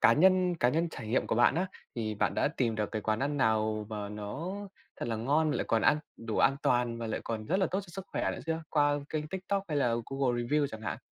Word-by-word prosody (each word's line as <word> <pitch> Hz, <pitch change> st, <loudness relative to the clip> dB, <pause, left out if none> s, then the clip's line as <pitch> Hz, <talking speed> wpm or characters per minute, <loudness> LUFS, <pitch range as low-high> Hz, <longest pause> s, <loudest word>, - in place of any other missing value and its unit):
cá 115 Hz, -, +7 dB
nhân 185 Hz, +3 st, +4 dB
cá 125 Hz, -7 st, +2 dB
nhân 165 Hz, +6 st, +1 dB
trải 125 Hz, -8 st, -8 dB
nghiệm 120 Hz, -, +1 dB
của -, -, 0 dB
bạn 120 Hz, +3 st, +5 dB
á, 180 Hz, +4 st, +1 dB, 0.3 s
thì 110 Hz, -2 st, -2 dB
bạn 105 Hz, -, 0 dB
đã -, -, +2 dB
tìm 115 Hz, -4 st, +1 dB
được 105 Hz, -1 st, -2 dB
cái 110 Hz, -1 st, -2 dB
quán 110 Hz, +1 st, 0 dB
ăn 145 Hz, +2 st, 0 dB
nào 110 Hz, -3 st, +1 dB
mà 105 Hz, -2 st, -4 dB
nó 105 Hz, -, -5 dB, 0.4 s
thật -, -, -4 dB
là 115 Hz, -, -1 dB
ngon 145 Hz, +7 st, +2 dB
lại -, -, 0 dB
còn 115 Hz, -, +2 dB
an 150 Hz, -, +5 dB, 0.2 s
đủ 115 Hz, -1 st, -4 dB
an 135 Hz, -, +4 dB
toàn 120 Hz, -1 st, +2 dB
và 115 Hz, -, -3 dB
lại 110 Hz, -, -2 dB
còn 110 Hz, -2 st, -3 dB
rất 185 Hz, -, +2 dB
là 190 Hz, -, +3 dB
tốt 190 Hz, -, 0 dB
cho 195 Hz, -, -13 dB
sức 190 Hz, +2 st, -7 dB
khỏe -, -, 0 dB
nữa -, -, -6 dB
chưa? 160 Hz, 0 st, -1 dB
Qua 145 Hz, -1 st, +3 dB
kênh 155 Hz, -1 st, -3 dB
Tiktok 190 Hz, +3 st, -2 dB
hay 150 Hz, -, -1 dB, 0.3 s
Google 130 Hz, -3 st, 0 dB
Reviews 145 Hz, +4 st, +2 dB
chẳng 110 Hz, -4 st, -8 dB
hạn? -, -, -3 dB
130 Hz, 260 wpm, -31 LUFS, 110-160 Hz, 0.4 s, cá